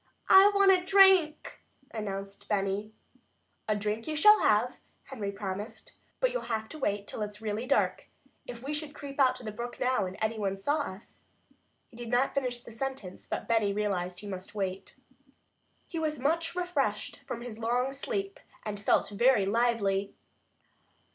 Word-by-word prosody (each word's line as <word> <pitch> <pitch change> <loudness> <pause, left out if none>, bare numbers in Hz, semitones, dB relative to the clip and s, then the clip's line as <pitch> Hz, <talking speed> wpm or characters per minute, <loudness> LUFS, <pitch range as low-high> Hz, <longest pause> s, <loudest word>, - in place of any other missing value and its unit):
"I 385 +2 +9
want 395 -1 +6
a 365 -1 +3
drink," 380 -5 +4 0.3
announced 195 -2 -6
Benny. 200 +1 -1 0.8
"A 215 - +2
drink 210 +2 -3
you 310 - -2
shall 420 +8 +7
have," 215 +4 +2 0.3
Henry 220 -7 -5
promised, 200 +2 -6 0.3
"but - - +2
you'll - - -2
have 220 -1 -1
to 310 - -8
wait 205 -6 -1
till 215 - -6
it's 210 0 -5
really 220 +2 -3
dark. 275 - +1 0.4
If 240 0 -8
we 285 +3 -3
should 300 -1 -4
creep 280 0 -8
out 255 -2 +5
to 255 - -9
the 215 - -4
brook 240 +3 -6
now, 255 -6 +1
and 185 - -8
any 220 0 -1
one 195 -2 -1
saw 285 +11 0
us 195 -7 -7 0.3
" - - -44
He 230 - -15
did 240 -1 -7
not 250 +3 +2
finish 250 -3 -2
his 230 -1 -12
sentence, 265 -9 -5
but - - -4
Benny 220 -3 +2
realized 190 -4 -1
that - - -7
he 210 - -8
must 190 +2 -7
wait. 190 -2 -4 0.9
He 330 - -4
was 305 -1 -1
much 330 +6 0
refreshed 295 -12 -1
from 235 - -5
his 235 -2 -8
long 245 +3 0
sleep, 395 - -3 0.3
and 205 -1 -4
felt 200 - +2
very 225 0 +3
lively. 200 -3 +1
230 Hz, 175 wpm, -29 LUFS, 205-280 Hz, 0.9 s, I